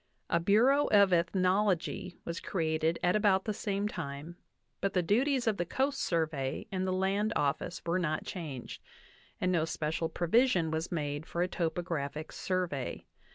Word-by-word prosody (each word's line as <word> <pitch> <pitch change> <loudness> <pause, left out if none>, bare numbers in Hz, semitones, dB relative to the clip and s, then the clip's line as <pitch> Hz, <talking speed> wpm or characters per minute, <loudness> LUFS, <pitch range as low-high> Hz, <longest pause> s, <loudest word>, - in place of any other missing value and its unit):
A 170 - +4
Bureau 240 +11 +4
of 200 -3 +5
Eth 170 0 +2
nology 185 -1 +1
was 170 0 -3
created 160 -2 0
at 180 +2 +3
about 200 -3 +3
the 215 - -1
same 200 0 -1
time, 160 -3 -6 0.4
but 195 - -1
the 180 - +2
duties 255 - +2
of 220 -3 +1
the 175 - +1 0.2
Coast 270 +1 +2
Survey 155 -3 -1
and 190 -1 -1
the - - 0
Land 195 +3 +1
Office 145 +5 -1
were 170 +2 +1
not 155 -3 -1
changed, 150 -9 -6 0.6
and 185 - +1
no 170 -3 +2
special 160 0 -2
provision 175 0 +2
was 160 +2 -2
made 145 -2 -3
for 175 - -1
a - - 0
topographic 160 -4 -3
survey. 180 -8 -2
175 Hz, 160 wpm, -31 LUFS, 160-200 Hz, 0.6 s, of